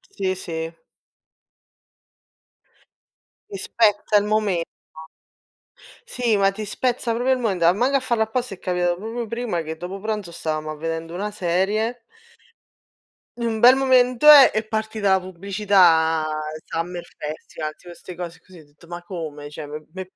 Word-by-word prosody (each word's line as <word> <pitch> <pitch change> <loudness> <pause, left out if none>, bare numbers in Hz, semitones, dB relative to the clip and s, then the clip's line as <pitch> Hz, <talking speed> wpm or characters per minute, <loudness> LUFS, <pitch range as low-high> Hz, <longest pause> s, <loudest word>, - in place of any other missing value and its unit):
Sì, 190 -1 -1
sì. 165 -2 -5 2.8
Ti 400 - -7
spezza 210 - +2
il 205 - +1
momento. 210 -5 0 1.4
Sì, 245 - 0
ma 195 -1 +3
ti 215 +2 -6
spezza 240 +1 -1
proprio 245 +3 +1
il 260 - +1
momento, 195 -8 -1
a 170 - +6
mango 250 +7 +1
a - - +1
farlo 235 -3 0
apposta 240 -1 -3
è 180 - -16
capitato 180 -1 0
proprio 225 +4 -5
prima 230 -6 -3
che 160 0 -6
dopo 180 +3 -6
pranzo 210 -4 -4
stavamo 155 -2 -3
a 155 - -6
vedendo 165 +1 -5
una 205 +4 -3
serie 210 +5 -1 1.4
in 235 - -2
un 225 -1 -1
bel 245 +3 +8
momento 255 0 +3
eh, 280 -3 +10
è 215 0 -2
partita 220 -2 -1
la 190 - +4
pubblicità, 185 -4 +2 0.4
Summer 175 +1 -4
Festival, 155 0 -6
tipo 175 -1 -13
'ste 180 +1 -11
cose 175 0 -7
così, 185 -2 -16
ho 155 - -16
detto: 145 +4 -21
"Ma 175 0 -8
come?" 160 -5 -7
Cioè 150 0 -8
m 150 +1 -8
m'è 190 - -6
195 Hz, 155 wpm, -22 LUFS, 170-225 Hz, 2.8 s, eh